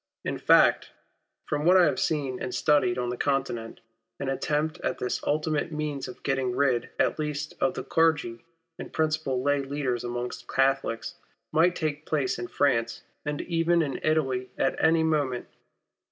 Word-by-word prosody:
In - - -2
fact, - - +4 0.6
from 150 -1 -2
what 180 +3 +6
I 180 - +7
have 150 - +1
seen 140 -5 -1
and 125 - -3
studied 155 +5 +3
on 125 -1 -1
the 125 - -3
Continent, 125 -5 -2 0.4
an 140 -1 -2
attempt 150 +3 -1
at - - -2
this 125 - -2
ultimate 155 +1 0
means 150 -3 -3
of 125 - -11
getting 135 -3 0
rid 130 -4 +1
at - - +1
least 150 -1 -3
of 180 +1 +2
the - - -4
clergy 150 -8 +1 0.4
and - - -7
principal 155 -5 0
lay 145 0 +2
leo, 140 -1 -2
ders 120 -1 -2
amongst 120 0 -5
Catholics, 135 -3 0 0.3
might 170 +3 +3
take 155 -1 -3
place 140 -6 0
in 120 - -4
France 115 -5 0 0.2
and 150 0 -2
even 170 0 +2
in 140 -3 -3
Italy 135 -5 0
at - - +1
any 160 0 +4
moment. 145 -6 0
145 Hz, 170 wpm, -27 LUFS, 130-155 Hz, 0.6 s, I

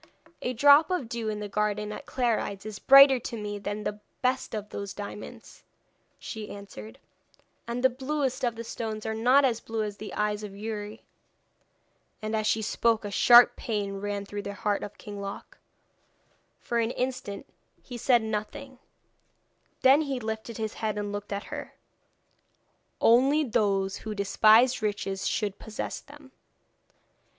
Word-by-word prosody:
'A 250 - -2
drop 285 +5 +6
of 360 -10 -1
dew 230 -1 -3
in 210 -1 -3
the 210 - -4
garden 210 0 -1
at - - -8
Clarides 220 -5 -1
is 215 -2 -7
brighter 275 +1 +8
to 235 - -6
me 205 -1 -5
than 205 +1 -4
the 210 0 -4 0.2
best 255 -2 0
of 210 -1 -5
those 200 -1 -6
diamonds,' 205 0 -9 0.6
she 220 -2 -7
answered, 110 - -10 0.7
'and 240 +1 -3
the 260 - +6
bluest 265 0 -2
of 240 -2 0
the 230 - -6
stones 220 -2 -5
are 220 - -1
not 250 +5 +4
as 235 -3 +1
blue 225 -1 -3
as 205 -1 -5
the 215 - -8
eyes 210 0 -1
of 205 -2 -8
Youri.' 210 0 -6 1.2
And 215 0 -3
as 215 -1 0
she 220 - +1
spoke 225 0 +1
a 205 - -4
sharp 240 +4 +7
pain 205 -3 -3
ran 200 0 -4
through 205 0 -5
the 200 0 -6
heart 205 0 -1
of 205 - -8
King 205 -1 -8
Loc. 200 0 -8 1.0
For 235 - -2
an 230 -1 +1
instant 250 -5 -4 0.4
he 250 - -9
said 240 -1 +3
nothing, 220 +5 -5 1.0
then 270 +3 +6
he 275 -4 -2
lifted 220 0 -5
his 220 -1 -3
head 215 -1 -1
and 205 0 -3
looked 205 0 -6
at 200 +1 -3
her. - - -7 1.2
'Only 270 +6 +4
those 200 -6 0
who 215 -1 -6
despise 215 +5 +4
riches 200 -2 -2
should 205 -3 -2
possess 220 -1 -5
them. 290 -2 -16
220 Hz, 160 wpm, -27 LUFS, 205-245 Hz, 1.2 s, brighter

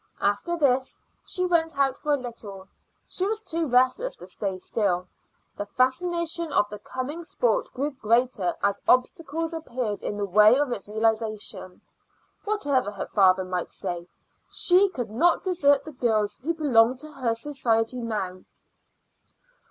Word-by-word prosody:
After 205 +13 0
this 265 -4 +1 0.2
she 365 -1 -1
went 325 -4 +1
out 270 -2 +2
for 300 - -3
a 290 - +4
little; 215 -7 -8 0.4
she 370 - -2
was 435 +1 -1
too 335 -6 -2
restless 255 - +2
to - - -12
stay 190 +1 -4
still. 185 -2 -1 0.5
The 205 - -4
fascination 335 - 0
of 205 - +3
the 210 - -7
coming 260 +9 -5
sport - - 0
grew 280 +3 -2
greater 235 -6 +1
as 200 0 +1
obstacles 320 +5 +1
appeared 250 -9 -3
in 205 - -4
the 205 - -1
way 210 +5 +6
of 285 -3 0
its 200 -5 -4
realization. 215 -3 -2 0.6
Whatever 285 - +1
her 205 -1 -5
father 190 -2 +4
might 180 -1 -3
say, 175 -2 -5 0.4
she 370 +3 +4
could 245 - -5
not 335 +10 +3
desert 285 -7 +3
the 310 - -7
girls 220 -6 0
who 330 +6 -2
belonged 255 -5 +4
to 305 - -10
her 255 -5 -1
society 230 -2 0
now. 210 -6 -3
255 Hz, 150 wpm, -26 LUFS, 210-320 Hz, 0.6 s, way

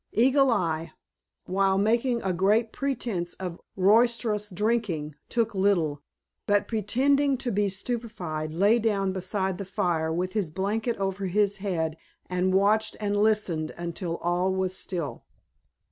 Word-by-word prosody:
Eagle 265 +4 +4
Eye, 165 -7 0 0.5
while 195 +1 +2
making 235 +4 +1
a 190 -1 0
great 210 +6 +2
pretense 230 -10 -2
of 180 -3 -6
roisterous 215 +1 +3
drinking, 195 -7 -1 0.2
took 230 -2 0
little, 175 -7 +1 0.5
but 205 0 +2
pretending 270 +6 +2
to 245 -1 -3
be 205 0 +1
stupefied 190 -7 -4
lay 200 +8 +3
down 200 -4 0
beside 190 0 -2
the - - -3
fire 175 -5 -1
with 180 +3 -2
his 205 -7 0
blanket 210 +7 -1
over 195 0 -2
his 200 +2 +1
head 165 -5 -2 0.3
and 180 +1 +1
watched 210 +3 +2
and 205 -1 -1
listened 205 -7 +1
until 170 0 -4
all 175 +2 +1
was 190 -1 -1
still. 170 -6 -4
195 Hz, 135 wpm, -27 LUFS, 180-220 Hz, 0.5 s, Eagle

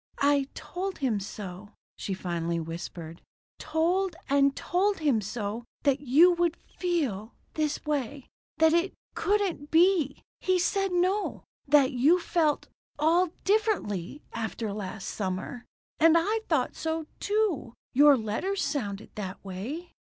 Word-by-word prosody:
"I 280 -1 +3
told 375 +1 -4
him 245 -7 0
so," 195 0 -8 0.2
she 195 - -4
finally 170 -2 -2
whispered. 165 0 -7 0.4
"Told 350 +3 0
and 275 0 +3
told 390 +3 +1
him 285 -9 +2
so. 210 +2 -4 0.2
That 280 -1 +3
you 295 +6 +6
would 345 -1 +1
feel 270 - -3 0.2
this 305 -1 -1
way. 285 -2 -2 0.3
That 320 0 +5
it 340 +3 +1 0.2
couldn't 385 -8 0
be. 330 -4 +3 0.2
He 370 -1 +2
said 390 +2 +1
no. 370 +4 0 0.2
That 275 -2 +5
you 285 +8 +4
felt 325 -3 +1 0.3
all 330 +4 +3
differently 375 - 0
after 220 -2 -3
last 205 0 -5
summer. 190 +4 -4 0.3
And 330 0 +6
I 420 +7 +1
thought - - +1
so, 320 0 -2
too. 410 - 0 0.2
Your 285 +1 +7
letters 295 - -2
sounded 205 -8 -3
that 200 -2 -6
way." 245 - -6
290 Hz, 130 wpm, -28 LUFS, 215-350 Hz, 0.4 s, Your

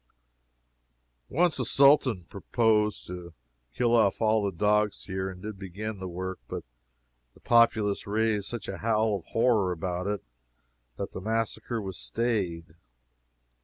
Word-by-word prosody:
Once 175 +2 +2
a - - +1
Sultan 135 -8 +4
proposed 105 +3 +1
to 85 -2 -8 0.4
kill 120 - +2
off 105 -4 +3
all 110 -1 +3
the 100 - 0
dogs 105 +2 +1
here, 95 0 -3
and 90 -1 -10
did 105 -2 -6
begin 100 +2 -5
the 95 - -5
work 95 +1 -5
but - - -5 0.7
the - - -18
populace 115 -4 +3
raised 105 -1 0
such 120 -2 -6
a 95 - -5
howl 110 -1 +2
of 85 - -20
horror 115 -5 +2
about 90 +2 -3
it 105 -1 -2 0.7
that - - -4
the 95 - -7
massacre 115 +2 -2
was 95 -6 -6
stayed. 85 - -2
105 Hz, 140 wpm, -28 LUFS, 95-115 Hz, 0.7 s, Sultan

